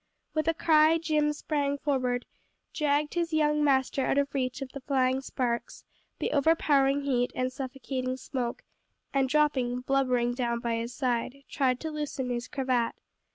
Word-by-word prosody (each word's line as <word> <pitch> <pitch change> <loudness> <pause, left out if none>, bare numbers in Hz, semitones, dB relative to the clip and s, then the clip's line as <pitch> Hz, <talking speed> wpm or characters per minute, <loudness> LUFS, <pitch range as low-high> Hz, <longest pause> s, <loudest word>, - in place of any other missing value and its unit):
With 310 -1 0
a 330 - +2
cry 315 0 +5
Jim 305 -2 +1
sprang 290 -1 -1
forward, 255 -4 -1 0.5
dragged 295 0 +1
his 340 -2 -1
young 300 -1 +2
master 270 -1 +2
out - - +1
of 280 0 +1
reach 255 -2 -1
of 260 - -9
the 275 - -8
flying 260 -1 +1
sparks, 245 -3 -3 0.3
the - - -2
overpowering 285 -2 +3
heat, 250 -3 +1
and 255 0 -1
suffocating 260 -1 -4
smoke, 250 -3 -4 0.5
and 270 -1 +2
dropping, 260 -4 +2
blubbering, 250 -2 +1
down 240 -1 -1
by 235 -1 -1
his 230 +1 -4
side, 255 +1 -1
tried 255 -3 +1
to 320 - -3
loosen 290 -4 -3
his 240 0 -3
cravat. 255 -4 0
270 Hz, 155 wpm, -28 LUFS, 250-295 Hz, 0.5 s, cry